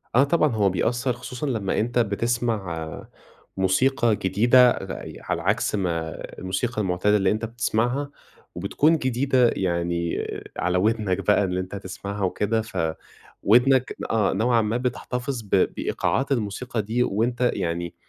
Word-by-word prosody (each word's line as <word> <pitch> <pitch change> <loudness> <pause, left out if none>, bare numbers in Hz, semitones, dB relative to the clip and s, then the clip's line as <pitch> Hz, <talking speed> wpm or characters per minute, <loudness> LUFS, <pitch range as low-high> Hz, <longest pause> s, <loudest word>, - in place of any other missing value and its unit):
،آه 135 - +7
طبعًا 155 0 +2
هو 100 -2 +3
بيأثر، 120 +7 0
خصوصًا 125 +4 -6
لمّا 110 -7 -1
أنت 120 +2 0
بتسمع 105 -7 -2 0.5
موسيقى 115 +5 +2
جديدة 120 +7 +5
ع 95 - -5
ي - - -9
على 85 - -3
عكس 105 +4 0
ما 85 -5 -1 0.3
الموسيقى 105 +5 -2
المعتادة 95 +2 +2
اللي 95 -2 +2
أنت 110 +2 -1
بتسمعها، 120 +4 -1 0.4
وبتكون 160 +3 +2
جديدة 130 -2 +2
يعني 85 -2 -1 0.3
على 90 0 0
ودنك 100 -1 0
بقى 105 0 +4
اللي 90 -1 -1
أنت 95 +2 -5
تسمعها 100 +1 -6
وكده، 105 +4 0
فودنك 110 +7 0
آه، 105 -4 +2
نوعًا 115 +3 +2
ما 110 +2 0
بتحتفظ 125 0 -3
ب 105 - -16 0.3
بإيقاعات 135 +1 -1
الموسيقى 115 0 -1
دي، 115 +4 0
وأنت 120 +3 0
يعني 85 0 -3
110 Hz, 135 wpm, -24 LUFS, 95-125 Hz, 0.5 s, آه